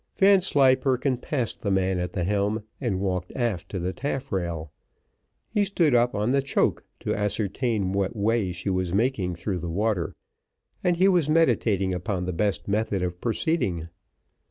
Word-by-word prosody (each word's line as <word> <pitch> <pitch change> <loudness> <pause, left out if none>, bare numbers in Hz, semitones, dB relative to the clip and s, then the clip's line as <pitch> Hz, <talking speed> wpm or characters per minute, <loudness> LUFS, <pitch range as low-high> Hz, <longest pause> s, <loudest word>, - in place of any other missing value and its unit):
Vanslyperken 135 -9 +4
passed 125 -2 -2
the 100 - -1
man 95 -1 +1
at 90 0 -3
the 90 - -1
helm, 105 +3 0 0.2
and 110 -8 -1
walked 90 -2 -2
aft 115 -9 -1
to 95 - -4
the 90 +1 -2
taffrail; 95 - -3 0.8
he 210 -2 +2
stood 175 -7 +2
up 120 0 +3
on 105 +4 +1
the 140 +1 +3
choak 135 - 0 0.2
to - - -1
ascertain 105 0 -1
what 100 +3 -1
way 105 -2 +1
she 90 +3 -3
was 90 -1 -1
making 100 -6 0
through 90 +2 -3
the 85 0 -4
water, 100 0 -1 0.7
and 175 -1 +2
he 185 +2 +5
was 175 -6 +3
meditating 115 - +2
upon 90 0 -2
the 90 - -2
best 100 +3 -1
method 100 -2 0
of 90 0 -4
proceeding. 115 - -1
105 Hz, 160 wpm, -26 LUFS, 95-130 Hz, 0.8 s, he